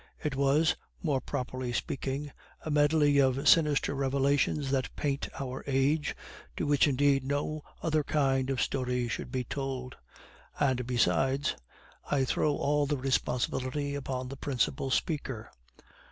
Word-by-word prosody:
It 150 -3 -1
was, 140 +3 +3 0.3
more 145 -6 +1
properly 130 -1 -3
speaking, 140 +3 -3 0.3
a 155 - -2
medley 145 -1 +4
of 135 +1 +2
sinister 150 -4 +4
revelations 140 +1 +1
that 135 -2 -1
paint 140 -2 -2
our 130 -1 -5
age, 140 +3 +1 0.4
to - - -1
which 145 0 +4
indeed 140 0 +3
no 145 +3 -2 0.2
other 155 -2 +1
kind 135 -3 +1
of 135 -2 +1
story 125 -2 -1
should 120 - -4
be 130 0 -1
told; 130 0 -4 0.6
and, 130 -4 +1
besides, 135 +3 +2 0.5
I 135 -2 +2
throw 145 +3 +1
all 145 0 +1
the 145 0 0
responsibility 130 +2 -1
upon 130 -2 -3
the 135 - -7
principal 135 0 -1
speaker. 130 -5 -2
135 Hz, 135 wpm, -30 LUFS, 130-145 Hz, 0.6 s, medley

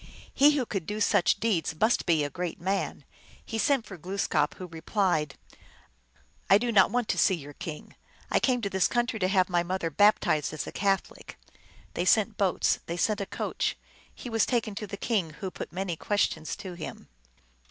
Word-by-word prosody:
He 290 +2 +5
who 255 - 0
could 195 -7 -4
do 210 +1 -3
such 200 -2 +3
deeds 175 -8 0
must 220 +3 +2
be 160 -3 +3
a 145 - -2
great 175 -2 -4
man. 185 -5 -2 0.4
He 225 - -4
sent 270 -1 +2
for 190 -4 -10
Glooskap, 175 -4 0
who 185 - -7
replied, 165 -3 -1 0.6
" - - -35
I 195 - +8
do 240 +2 -1
not 210 - +5
want 245 -2 0
to - - +1
see 190 - +4
your 145 -3 -10
king. 150 +1 -8 0.4
I - - +4
came 250 -2 +1
to 200 - -2
this 190 -1 +3
country 240 -2 -1
to 185 - +2
have 185 -1 +3
my 175 -2 +1
mother 175 -1 -2
baptized 155 -5 +3
as 150 - -4
a - - -7
Catholic." 195 -1 -2 0.6
They 175 - -1
sent 215 +2 +3
boats, 195 -3 +1
they 170 - -3
sent 210 +3 +1
a 195 - -3
coach; - - -2 0.3
he - - -10
was 225 -2 +1
taken 235 -4 0
to 210 +1 -5
the 200 - -6
king, 195 -9 -1
who 190 -2 -4
put - - -7
many 185 -2 -3
questions 160 -4 -1
to 185 -2 -8
him. 170 -3 -8
190 Hz, 195 wpm, -28 LUFS, 165-215 Hz, 0.6 s, I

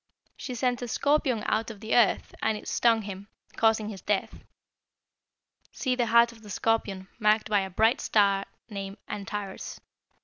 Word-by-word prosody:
She 250 - -6
sent 245 +1 0
a 245 - -3
scorpion 270 -3 +1
out 220 +1 0
of 220 -3 -9
the 220 +1 -3
earth, 235 -4 +3
and 220 -1 +1
it - - -11
stung 230 -2 +3
him, 200 0 -7 0.3
causing 220 -1 +2
his 195 -4 -8
death. 205 0 -2 1.3
See 255 - -1
the 245 -2 0
heart 235 +1 +5
of 230 -1 -16
the 210 - -12
scorpion, 200 -3 -1
marked 215 0 +2
by 205 - +5
a 190 -1 -3
bright 220 +7 +3
red - - -5
star 200 -2 +3 0.2
named 200 -2 -6
Antares. 200 -1 -5
220 Hz, 170 wpm, -27 LUFS, 200-235 Hz, 1.3 s, heart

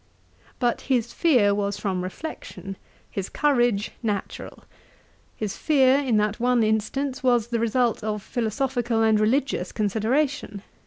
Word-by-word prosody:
But 240 -2 0
his 240 -3 +1
fear 245 -12 +3
was 200 0 -1
from 185 -3 -2
reflection; 195 -2 -7 0.4
his 195 -1 -4
courage 240 -8 +1
natural. 210 -4 -4 0.7
His 210 -3 -4
fear, 270 -3 +4
in 255 -6 +1
that 210 +1 0
one 245 -1 +3
instance, 235 +6 -1
was 240 -3 +2
the 235 -1 0
result 230 0 +1
of 210 -2 -3
philosophical 240 -1 -1
and 220 -1 +4
religious 225 -4 0
consideration. 220 +1 -1
230 Hz, 125 wpm, -24 LUFS, 210-255 Hz, 0.7 s, fear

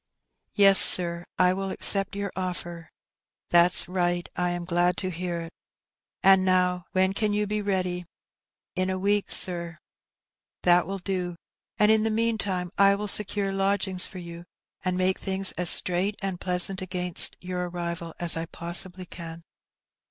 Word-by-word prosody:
"Yes, 195 -2 +6
sir, 170 -1 +3
I 180 0 +3
will 195 +1 -4
accept 195 +1 +2
your 200 -1 -4
oflfer." 175 -2 -5 0.3
" - - -66
That's 175 +1 +5
right; 175 -1 -2
I 180 0 -1
am 175 0 -4
glad 175 0 0
to 185 -1 -3
hear 175 0 -4
it. 165 0 -10 0.7
And 190 0 +5
now,^ 180 -1 +1
when 190 0 +2
can 210 0 -1
you 210 0 0
be 210 +1 -3
ready? 185 -3 -2 0.4
" - - -67
"In 185 0 -1
a 185 - -2
week, 200 +2 0
sir." 170 -2 0 0.9
"That 175 0 +4
will 195 +1 -4
do; 180 -2 -4 0.4
and 210 +1 +4
in 220 0 +3
the 225 - 0
meantime 215 -5 -1
I 200 0 +5
will 210 +1 -5
secure 200 -1 0
lodg 195 +1 0
ings 185 -1 +1
for 190 - -12
you, 170 -1 -10 0.4
and 185 -1 -1
make 185 0 0
things 195 0 +1
as 180 -2 +2
straight 185 +3 +2
and 195 -3 -5
pleasant 180 +1 +2
against 180 -1 +2
your 180 -1 -5
arrival 170 -1 -6
as 175 -1 +1
I 165 0 -4
possibly 175 +2 -1
can." 165 -1 -10
185 Hz, 165 wpm, -25 LUFS, 175-195 Hz, 0.9 s, Yes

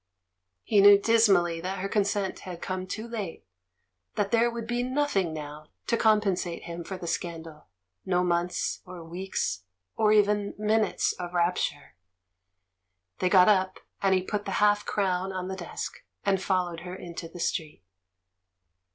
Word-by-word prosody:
He 205 -2 +4
knew 200 0 +9
dismally 200 -6 +3
that 185 +3 -3
her 195 +1 -2
consent 200 -1 0
had 180 -2 -8
come 185 0 -4
too 220 +4 -5
late, 215 -7 -6 0.7
that 205 -1 0
there 235 0 +4
would 235 -1 -5
be 240 +1 -1
nothing 255 - 0
now 150 0 -7 0.2
to - - +1
com 220 -2 +4
pensate 185 -4 -2
him 170 0 -6
for 190 +2 -6
the 180 - -8
scandal 165 -2 -5 0.2
— 90 - -56
no 180 -1 +2
months, 175 0 -1
or 180 -2 -10
weeks, 170 - -3 0.3
or 215 -1 +3
even 210 -1 +3
minutes 215 +1 +1
of 175 0 -7
rapture. 170 -4 0 1.3
They 185 - +2
got 180 -1 +6
up, 190 -3 +2 0.2
and 195 -1 +4
he 185 - +1
put 205 +2 -3
the - - -3
half 205 0 +3
crown 190 -1 0
on 185 0 -4
the 190 - -3
desk, 175 -3 -6 0.2
and 195 -2 +2
followed 180 -3 0
her 180 +2 -7
into 170 -2 -7
the 175 - -11
street. 155 - -3
185 Hz, 160 wpm, -27 LUFS, 175-205 Hz, 1.3 s, knew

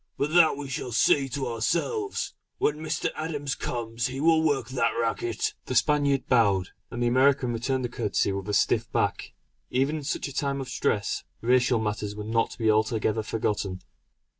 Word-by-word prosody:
But 150 +3 -1
that 170 -5 +6
we 145 -1 -5
shall 130 -2 -4
see 135 +4 +3
to 135 +1 -3
ourselves; 170 - -1 0.2
when 150 - +1
Mr. 155 0 -2
Adams 145 -3 -3
comes 115 -1 -3
he 130 +1 -5
will 160 +1 +4
work 145 -6 0
that 125 -3 +1
racket!" 115 0 -1
The 130 - -2
Spaniard 140 +2 +2
bowed, 100 -7 +3 0.2
and 120 0 -3
the - - +3
American 130 0 +3
returned 130 +2 -1
the - - -3
courtesy 110 -4 0
with 100 +1 -4
a - - -1
stiff - - +1
back. - - -1 0.4
Even 135 +5 +1
in 150 - -6
such 140 - -2
a 140 - -8
time 140 0 -1
of 135 - -5
stress, 100 -1 -1 0.2
racial 125 +1 +3
matters 105 -1 -2
were 105 - -5
not 115 +1 +1
to - - -11
be 110 -2 +3
altogether 110 0 +1
forgotten. 100 -4 -2
125 Hz, 185 wpm, -27 LUFS, 110-140 Hz, 0.4 s, that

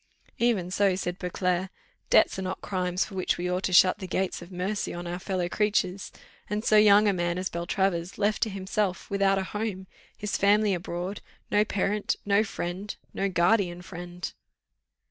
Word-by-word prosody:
"Even 215 -7 +1
so," 195 -1 +3
said 180 -1 -3
Beauclerc, 180 0 -1 0.4
"debts - - +4
are - - -2
not 185 0 -3
crimes 180 -1 -1
for - - -12
which 185 -1 0
we 180 - -2
ought 180 +1 0
to - - -1
shut 185 0 +6
the 190 - -6
gates 190 0 -1
of 175 +2 -11
mercy 190 +3 -2
on 175 0 -6
our 175 +1 -4
fellow 185 -2 -2
creatures 195 -1 0 0.4
and 210 +1 -2
so 215 - +4
young 210 0 +7
a 200 - +3
man 175 -1 -1
as 185 +1 -2
Beltravers, 170 +1 -1
left 210 +1 +1
to 225 - +2
himself, 195 -1 -2
without 195 0 +3
a 190 - 0
home, 205 -1 -4 0.3
his 210 - -2
family 205 +1 +4
abroad, 180 +2 -4 0.3
no 210 - +4
parent, 205 0 0
no 200 +1 +4
friend 195 0 -5 0.2
no 195 - 0
guardian 180 -1 +2
friend." 175 0 -7
190 Hz, 180 wpm, -27 LUFS, 180-205 Hz, 0.4 s, young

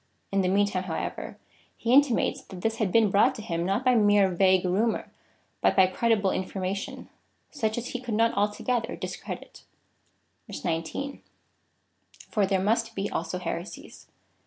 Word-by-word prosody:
In 195 0 +2
the 185 - +1
meantime, 195 -1 +1
however, 165 -3 -4 0.4
he 235 +1 0
intimates 280 -3 +3
that 185 -2 -10
this 225 +2 -1
had 210 -5 0
been 220 -2 +4
brought 200 - +4
to - - -7
him 170 -5 -2
not 195 +8 -1
by 255 - +5
mere 205 -3 +4
vague 185 0 +3
rumour, 210 +5 0 0.5
but - - +3
by 190 - +7
credible 205 +1 +1
information, 190 +1 -4 0.4
such 220 -7 -1
as 240 +1 -4
he 250 - -4
could 240 -4 -3
not 230 +1 +3
altogether 210 +4 -1
dis - - -5
credit. - - -8 1.0
19. 165 - -3 1.1
For 205 -3 +2
there 190 -1 +1
must 225 +4 +1
he 195 +1 -2
also 170 +2 -2
heresies. 175 +1 -7
200 Hz, 155 wpm, -27 LUFS, 185-230 Hz, 1.1 s, by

